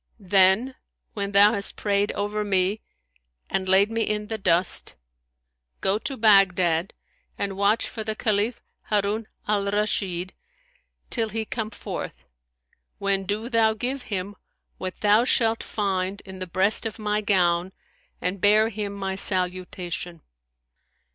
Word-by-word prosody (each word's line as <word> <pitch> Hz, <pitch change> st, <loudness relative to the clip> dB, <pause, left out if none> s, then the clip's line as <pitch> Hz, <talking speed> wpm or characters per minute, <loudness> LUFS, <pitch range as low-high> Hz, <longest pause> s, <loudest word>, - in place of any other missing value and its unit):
Then, 195 Hz, +6 st, +3 dB, 0.4 s
when 200 Hz, -1 st, -3 dB
thou 205 Hz, +2 st, +6 dB
hast 200 Hz, -2 st, 0 dB
prayed 205 Hz, 0 st, 0 dB
over 205 Hz, +1 st, -2 dB
me 195 Hz, +1 st, +1 dB, 0.7 s
and 190 Hz, -1 st, -1 dB
laid 195 Hz, +3 st, +5 dB
me 225 Hz, 0 st, -1 dB
in 210 Hz, -1 st, -1 dB
the 220 Hz, -, -2 dB
dust, 175 Hz, -, +1 dB, 0.8 s
go 195 Hz, +2 st, +1 dB
to 270 Hz, +3 st, -3 dB
Baghdad 185 Hz, -5 st, +4 dB, 0.4 s
and 195 Hz, -1 st, -2 dB
watch 200 Hz, +3 st, +2 dB
for 220 Hz, -, -6 dB
the 215 Hz, 0 st, -3 dB
Caliph 215 Hz, +2 st, 0 dB, 0.3 s
Harun 210 Hz, +1 st, 0 dB, 0.2 s
al 205 Hz, -1 st, +1 dB
Rashid, 195 Hz, -3 st, -1 dB, 0.8 s
till 225 Hz, -3 st, 0 dB
he 220 Hz, +1 st, -3 dB
come 220 Hz, -1 st, -4 dB
forth, 65 Hz, -, -7 dB, 0.7 s
when 195 Hz, -1 st, 0 dB
do 210 Hz, +3 st, -2 dB
thou 225 Hz, -3 st, +2 dB
give 255 Hz, +4 st, -2 dB
him 200 Hz, 0 st, -3 dB, 0.4 s
what 185 Hz, -1 st, -5 dB
thou 210 Hz, +2 st, +5 dB
shalt 230 Hz, -2 st, +2 dB
find 195 Hz, -1 st, -2 dB
in 190 Hz, -2 st, -10 dB
the 185 Hz, -, -5 dB
breast 195 Hz, +6 st, +1 dB
of 220 Hz, -, -8 dB
my 210 Hz, -1 st, -1 dB
gown 180 Hz, -3 st, +2 dB, 0.5 s
and 180 Hz, +1 st, -2 dB
bear 215 Hz, +2 st, +5 dB
him 205 Hz, -2 st, -4 dB
my 195 Hz, -1 st, -3 dB
salutation.' 180 Hz, -2 st, -2 dB
200 Hz, 135 wpm, -24 LUFS, 190-215 Hz, 0.8 s, thou